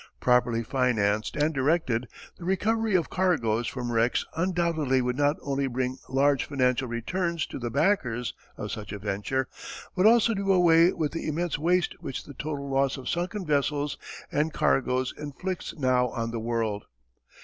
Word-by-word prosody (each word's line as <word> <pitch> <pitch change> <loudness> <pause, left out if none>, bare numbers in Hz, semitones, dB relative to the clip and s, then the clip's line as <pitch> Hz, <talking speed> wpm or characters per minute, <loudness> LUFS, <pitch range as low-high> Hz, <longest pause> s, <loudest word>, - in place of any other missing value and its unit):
Properly 125 -2 +2
financed 110 -4 +1
and 150 +1 +1
directed, 130 -4 +1 0.3
the - - -9
recovery 215 +3 +1
of 170 -3 +1
cargoes 120 - +1
from 125 -2 -4
wrecks 115 +1 +2
undoubtedly 165 -6 +1
would 125 0 0
not 145 +2 +2
only 140 -1 -1
bring 130 +1 -2
large 140 +1 +2
financial 130 -2 +1
returns 170 +8 -2
to - - -7
the 120 -1 -3
backers 125 - +1 0.2
of - - -5
such 105 -1 -6
a 105 - -4
venture, 105 +6 -2 0.5
but 190 +2 +5
also 230 0 +5
do 195 -1 0
away 175 -1 +6
with 150 -2 -2
the 165 - -4
immense 160 0 -1
waste 175 +2 +2
which 135 - -5
the 145 - -11
total 145 0 -4
loss 135 0 +1
of 130 - -6
sunken 180 +3 -2
vessels 145 -1 0 0.3
and 150 +1 0
cargoes 130 -2 +1
inflicts 170 +5 -5
now 130 -3 +2
on 115 -1 -3
the 115 - -3
world. 110 -2 -2
140 Hz, 160 wpm, -27 LUFS, 125-170 Hz, 0.5 s, away